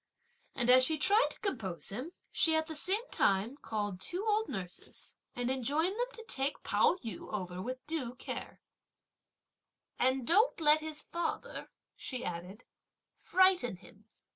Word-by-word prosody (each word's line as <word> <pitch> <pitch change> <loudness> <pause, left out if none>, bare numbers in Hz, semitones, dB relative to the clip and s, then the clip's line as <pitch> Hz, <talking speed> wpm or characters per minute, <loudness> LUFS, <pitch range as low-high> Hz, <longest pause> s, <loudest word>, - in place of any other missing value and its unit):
And 245 0 +3
as 255 0 +8
she 315 +4 +4
tried 410 +10 +5
to - - -9
compose 220 - -1
him, 255 - -5 0.2
she 320 -1 +4
at 315 0 +2
the 320 - -6
same 390 +10 +1
time 200 +7 +2
called 205 -7 -3
two 360 - -2
old 435 0 +1
nurses 190 -7 -5 0.2
and 245 +1 -1
enjoined 290 +8 +1
them - - +1
to 460 - -7
take 275 +2 -2
Pao - - +3
yü 225 - -7
over 180 -3 -4
with 255 +5 -6
due 280 -6 -2
care, - - -6 1.4
"And 260 0 +2
don't 415 - +3
let 305 -1 +5
his 310 -1 -2
father," 340 0 -4 0.3
she 255 -2 -4
added, 180 +6 -6 0.6
"frighten 370 - +3
him!" 200 +3 -18
265 Hz, 150 wpm, -32 LUFS, 220-340 Hz, 1.4 s, as